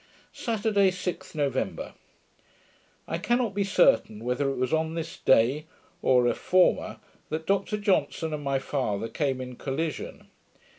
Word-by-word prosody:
Saturday, 210 -3 +1
6th 185 -3 -5
November 145 -3 -2 1.1
I 165 - -2
cannot 240 +1 +1
be 200 0 +1
certain, 195 - +3
whether 125 +3 0
it 135 - -2
was 130 +2 -1
on 160 0 0
this 165 -1 -5
day, 130 +6 +3 0.3
or 125 -2 +4
a 120 - +3
former, 185 +8 +2 0.3
that 160 +1 -3
Dr 200 +3 0
Johnson 185 -5 0
and 150 -1 -4
my 140 -1 +1
father 125 -6 -2
came 135 -1 -1
in 125 -1 -7
collision. 150 +2 -4
155 Hz, 140 wpm, -27 LUFS, 130-190 Hz, 1.1 s, or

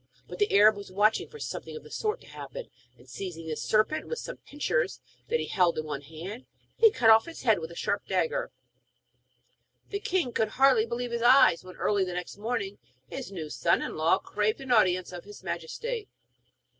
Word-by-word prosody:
But 180 - -9
the 205 - +2
Arab 210 +1 +7
was 200 -2 -9
watching 210 +3 +2
for 455 - -11
something - - -6
of 460 - -8
the - - -14
sort 430 +2 -2
to - - -16
happen, - - -8 0.3
and - - -19
seizing 175 -4 -7
the 160 -1 -3
serpent 215 - +1
with 475 - -3
some - - -6
pincers 400 +13 -2 0.3
that 475 - +1
he - - -2
held 180 -4 +2
in 155 - -2
one 145 -2 -4
hand, 165 - -9 0.3
he 450 - +7
cut 230 - +4
off 220 +5 +6
its 335 - -9
head 220 -6 +4
with 160 0 -6
a 170 - -11
sharp - - -2
dagger. - - 0 1.4
The 400 - -3
king 355 -10 0
could 220 - +1
hardly 260 -4 +5
believe 240 +1 -3
his 235 0 -2
eyes 245 -8 +6
when, 185 0 -11
early 205 -2 +1
the 180 -1 -4
next 180 +2 -5
morning, 210 -3 -3 0.3
his 190 - -6
new 160 -6 -6
son 170 - +2
in - - -5
law 160 +4 +3
craved 210 +4 -1
an 270 -2 -6
audience 185 -6 +3
of 175 -1 -8
his 205 0 -12
Majesty. 470 -2 -4
215 Hz, 205 wpm, -28 LUFS, 180-275 Hz, 1.4 s, Arab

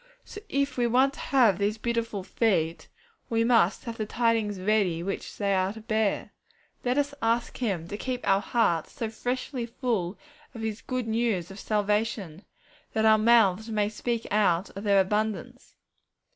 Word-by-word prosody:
So 415 - -9
if 280 -4 -1
we 240 - +3
want 260 +4 +3
to - - -12
have 235 -9 +3
these 205 +2 0
beautiful 230 -3 -2
feet, 175 -6 0 0.4
we 230 0 +2
must 230 -6 +3
have 230 -2 -6
the 215 - -2
tidings 225 -4 0
ready 185 -4 +1
which 195 +2 -5
they 200 -1 +1
are 190 0 +1
to 220 - -10
bear. 220 -2 -1 0.5
Let 250 +2 0
us 285 0 +1
ask 230 +1 0
Him 190 -9 -2
to 205 - -5
keep 250 +2 -4
our 195 0 +4
hearts 190 -9 0
so 225 -2 -4
freshly 245 +1 -3
full 225 -7 -2 0.4
of 230 - -6
His 220 -1 -3
good 255 -2 -3
news 220 -6 0
of 195 - -10
salvation, 210 -4 -1 0.5
that 220 0 +1
our 220 0 +6
mouths 220 -2 +4
may 210 -2 +1
speak 230 +2 -3
out 195 -3 +2
of 195 - -6
their 200 -1 +5
abundance. 210 +1 -2
220 Hz, 170 wpm, -27 LUFS, 200-235 Hz, 0.5 s, our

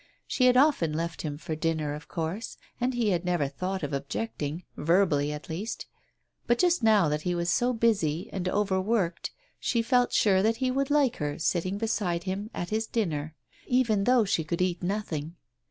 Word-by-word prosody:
She 255 - +1
had 250 0 +5
often 260 - +3
left 165 +2 -3
him 145 -2 -4
for 155 +1 -4
dinner, 155 -2 -1
of 150 +1 -8
course, 170 +7 -4 0.2
and 250 +1 0
he 235 -3 +1
had 175 -1 0
never 175 -5 +1
thought 185 +6 -4
of 145 0 -3
objecting, 145 +2 -3
verbally 150 -3 +2
at 150 0 -7
least 185 +8 -4 0.3
— - - -46
but 240 - +3
just 355 0 +3
now 215 -6 +5
that 150 0 -1
he 175 +2 -1
was 170 0 0
so 245 +6 +2
busy 205 -9 +1
and 185 -2 -2
overworked 190 -2 0 0.3
she 235 -2 0
felt 245 0 +3
sure 190 -3 +4
that 220 +3 +2
he 255 0 0
would 275 +2 0
like 285 -4 +3
her, 145 -1 -3
sitting 185 +3 0
beside 200 -6 -1
him 195 +3 -3
at 175 -2 -5
his 220 +1 0
dinner, 160 -8 -2 0.3
even 230 -6 +2
though 245 -2 +4
she 170 -4 0
could 170 +2 -3
eat 180 -1 0
nothing. 175 -5 -3
185 Hz, 190 wpm, -28 LUFS, 160-225 Hz, 0.3 s, had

